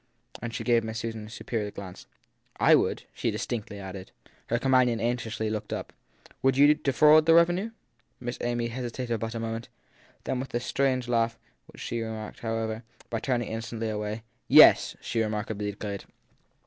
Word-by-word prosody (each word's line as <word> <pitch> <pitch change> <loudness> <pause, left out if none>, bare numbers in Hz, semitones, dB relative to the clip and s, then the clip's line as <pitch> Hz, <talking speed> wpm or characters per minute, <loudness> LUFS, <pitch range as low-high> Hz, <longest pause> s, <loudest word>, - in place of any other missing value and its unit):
And 120 0 -4
she - - -4
gave 120 -2 +3
Miss 110 0 -4
Susan 115 -2 -5
a - - -12
superior 110 -1 -3
glance. 100 -3 -9 0.5
I - - +6
would! - - +2
she - - -1
distinctly 105 -3 -4
added. 95 -1 -8 0.4
Her 120 - +1
companion 125 -2 +3
anxiously 115 -2 -1
took 110 -1 -3
it - - -6
up. - - -7 0.5
Would 135 0 +3
you 145 +2 +7
defraud 150 +2 +5
the 165 - +7
revenue? 175 +5 +4 0.5
Miss 120 0 -5
Amy 120 -1 -1
hesitated 120 -1 -3
but 115 +1 -4
a - - -2
moment; 115 0 -4 0.5
then 130 - -2
with 130 -1 -5
a - - +2
strange 130 0 0
laugh, 115 -1 +1 0.3
which - - -11
she 120 - -3
covered, 110 -1 -6
however, 115 0 -3 0.3
by 115 - -1
turning 120 -2 -1
instantly 115 0 -4
away, 105 +1 -3 0.2
Yes! - - +8
she 115 - -1
remarkably 105 -1 -2
declared. 100 -1 -5
115 Hz, 170 wpm, -28 LUFS, 110-125 Hz, 0.5 s, Yes